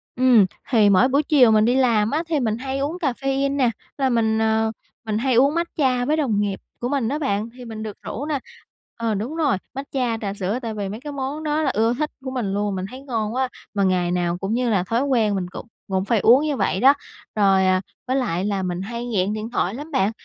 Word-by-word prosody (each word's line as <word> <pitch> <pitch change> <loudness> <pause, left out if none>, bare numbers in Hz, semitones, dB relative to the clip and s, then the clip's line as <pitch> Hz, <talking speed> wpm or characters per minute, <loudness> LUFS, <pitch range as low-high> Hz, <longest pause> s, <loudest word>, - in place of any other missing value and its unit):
Ừm, 245 -5 +5 0.2
thì 215 -5 +5
mỗi 200 +6 +5
buổi 280 +3 +2
chiều 265 -7 +5
mình 215 0 +4
đi 245 +2 +2
làm 230 -4 +3
á 315 +3 0
thì 310 -3 +1
mình 220 -3 0
hay 265 +2 -4
uống 300 +6 -2
caffein 275 -1 0
nè, 250 -3 +3 0.3
là 265 -2 +1
mình, 220 -2 +2
ờ, 220 0 +2 0.3
mình 215 -1 -1
hay 255 +2 +1
uống 275 +5 +4
matcha 265 -7 0
với 305 +3 +1
đồng 230 -9 +1
nghiệp 200 -2 -1 0.2
của 245 - -1
mình 265 -5 0
á 295 +2 -2
bạn, 220 -5 -1
thì 250 - -9
mình 220 -1 -6
được 210 -2 -6
rủ 285 - -5
nà. 295 -3 -1 0.6
Ờ, 230 -2 -1
đúng 230 +10 -3
rồi, 295 - +1 0.2
matcha, 260 -4 -2
trà 200 -1 -2
sữa 200 +5 -2
tại 225 -2 -4
vì 200 -2 -4
mấy 215 +3 -6
cái 290 +1 -7
món 280 +3 -4
đó 305 +1 0
là - - +2
ưa 225 +3 +2
thích 300 +4 -2
của 260 - -3
mình 225 -7 -2
luôn, 205 -1 -1
mình 185 0 -3
thấy 260 +1 -9
ngon 225 -4 -2
quá, 260 0 0 0.3
mà 200 -1 +1
ngày 180 -2 +1
nào 175 -1 0
cũng 195 +4 -3
như 245 0 +1
là 195 -5 +2
thói 230 +6 0
quen 225 -7 +2
mình 185 -2 -2
cũng - - -8 0.2
cũng 190 0 0
phải 230 -2 +2
uống 245 +8 +6
như 290 -4 -1
vậy 190 - 0
đó. 270 +4 +7 0.4
Rồi, 195 -2 +4
à, 185 0 +3 0.3
với 260 - 0
lại 195 -8 0
là 200 -2 -1
mình 180 0 -3
hay 235 +4 -5
nghiện 205 -3 0
điện 215 +1 -4
thoại 190 -4 0
lắm 300 +4 -8
bạn, 200 -4 +2
230 Hz, 250 wpm, -22 LUFS, 205-270 Hz, 0.6 s, đó